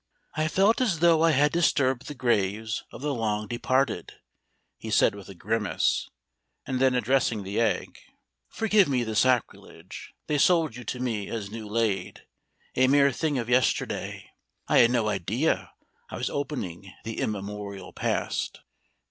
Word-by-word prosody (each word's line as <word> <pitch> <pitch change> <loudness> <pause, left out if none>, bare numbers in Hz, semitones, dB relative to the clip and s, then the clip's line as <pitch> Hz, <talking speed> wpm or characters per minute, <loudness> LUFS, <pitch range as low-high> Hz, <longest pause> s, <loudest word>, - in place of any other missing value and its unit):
"I 155 0 0
felt 200 +9 +3
as 215 -9 +1
though 165 0 +4
I 165 - +5
had 150 -1 +3
disturbed 135 -6 +1
the 150 - -6
graves 110 -3 0
of 115 - -10
the 150 -1 0
long 110 -3 -1
departed," 130 +3 -1 0.7
he - - -7
said - - +4
with 100 -1 -11
a 100 - -10
grimace, 105 +3 0 0.6
and 130 -1 -2
then 130 -1 +3
addressing 125 -3 +1
the 100 +3 -3
egg: 110 -6 -1 0.5
"Forgive 215 -3 +3
me 130 -4 +1
the 110 -1 -4
sacrilege: 125 +1 -1
they 150 -1 0
sold 165 -6 +3
you 125 - -8
to 125 - -4
me 115 -5 -2
as 105 -3 -5
new 110 -1 -7
laid, 105 -2 -2 0.5
a 130 0 +4
mere 140 +1 +5
thing 150 +2 -1
of 120 -2 -2
yesterday. 125 0 0 0.4
I - - +4
had 120 - +6
no 120 -3 +1
idea 110 - -1 0.4
I - - -6
was - - -2
opening 100 - -4
the 115 0 -5
immemorial 100 -2 -5
past. - - -2
120 Hz, 155 wpm, -26 LUFS, 105-140 Hz, 0.7 s, had